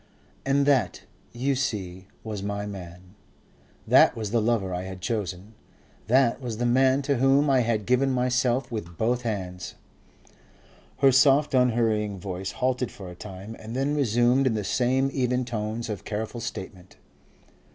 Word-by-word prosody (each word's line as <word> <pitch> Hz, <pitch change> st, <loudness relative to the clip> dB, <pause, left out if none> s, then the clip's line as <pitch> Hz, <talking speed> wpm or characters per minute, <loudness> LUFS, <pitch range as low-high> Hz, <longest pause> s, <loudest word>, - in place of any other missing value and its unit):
And 140 Hz, +1 st, +3 dB
that, 140 Hz, -4 st, +1 dB, 0.3 s
you 130 Hz, +4 st, -1 dB
see, 100 Hz, -9 st, -3 dB, 0.2 s
was 105 Hz, -3 st, -5 dB
my 100 Hz, 0 st, -3 dB
man. 90 Hz, -2 st, -9 dB, 0.7 s
That -, -, +5 dB
was 110 Hz, -3 st, -4 dB
the 115 Hz, -1 st, +2 dB
lover 105 Hz, -5 st, 0 dB
I 90 Hz, -, -2 dB
had 95 Hz, 0 st, -7 dB
chosen. 100 Hz, 0 st, -4 dB, 0.5 s
That 130 Hz, +1 st, +3 dB
was 120 Hz, -4 st, -4 dB
the 120 Hz, -, -1 dB
man 130 Hz, +3 st, +3 dB
to 140 Hz, -1 st, 0 dB
whom 135 Hz, +3 st, +3 dB
I 130 Hz, -, +4 dB
had 115 Hz, -3 st, 0 dB
given 125 Hz, +2 st, +2 dB
myself 125 Hz, 0 st, 0 dB
with 85 Hz, -7 st, -6 dB
both 120 Hz, +5 st, 0 dB
hands." 95 Hz, -6 st, -5 dB, 1.2 s
Her 135 Hz, -1 st, +5 dB
soft 140 Hz, +3 st, +4 dB
unhurrying 115 Hz, -5 st, +2 dB
voice 95 Hz, 0 st, -5 dB
halted 125 Hz, -1 st, -1 dB
for 95 Hz, -3 st, -10 dB
a -, -, -10 dB
time, 100 Hz, +3 st, -9 dB
and 110 Hz, +2 st, -8 dB
then 135 Hz, +3 st, 0 dB
resumed 125 Hz, -1 st, +2 dB
in 115 Hz, -, +1 dB
the 105 Hz, -, -2 dB
same 130 Hz, +5 st, +1 dB
even 125 Hz, -1 st, 0 dB
tones 110 Hz, -1 st, -4 dB
of 105 Hz, -3 st, -5 dB
careful 110 Hz, +3 st, -4 dB
statement. 95 Hz, -3 st, -8 dB
115 Hz, 155 wpm, -26 LUFS, 100-130 Hz, 1.2 s, That